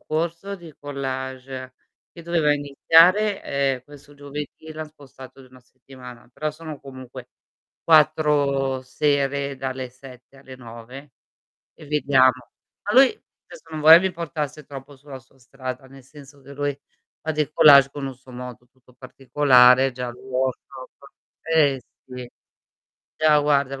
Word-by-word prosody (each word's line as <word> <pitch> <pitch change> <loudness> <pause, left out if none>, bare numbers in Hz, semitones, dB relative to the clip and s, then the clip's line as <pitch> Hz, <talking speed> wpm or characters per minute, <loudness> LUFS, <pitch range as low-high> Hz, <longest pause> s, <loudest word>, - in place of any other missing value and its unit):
corso 170 +5 -4
di 170 -4 -14
collage, 130 -2 -6 0.4
che 170 - -12
doveva 165 -3 +1
iniziare 165 +8 +3
ehm, 135 -2 -1
questo 145 0 -16
giovedì 145 +2 -9
e 160 - -8
l'han 155 0 -7
spostato 135 -3 -15
di 130 - -16
1 130 0 -18
settimana, 125 -1 -15
però 155 +4 -3
sono 155 -1 -10
comunque 130 -2 -11 0.5
4 145 -4 +2
sere, 140 +1 -1
dalle 130 -1 -5
7 130 +1 -16
alle 130 -1 -13
9 125 +3 -12 0.6
e - - -15
vediamo. 140 -3 +3 0.5
Ma 205 - -3
lui, 265 +1 +7 0.4
adesso 165 - -15
non 155 -1 -5
vorrei 160 +2 +9
vi 190 +1 -1
portasse 155 -3 -5
troppo 140 0 -11
sulla 135 0 -12
sua 130 +1 -27
strada, 130 +1 -8
nel 135 0 -16
senso 140 +1 -16
che 140 +1 -13
lui 145 0 -3 0.4
fa 160 - -3
dei 150 -1 -2
collage 140 -3 +7
con 140 -1 -6
un 130 - -8
suo 130 0 -18
modo 125 -1 -10
tutto 125 -1 -26
particolare, 130 0 +3
già 125 0 -6
il 120 - -10
workshop 130 0 -5 0.5
eh 145 -5 +1 0.2
sì. 125 -1 -9 0.9
Già, 155 -1 +4
guarda, 140 -2 +1
il 135 - -8
140 Hz, 145 wpm, -22 LUFS, 130-150 Hz, 0.9 s, vorrei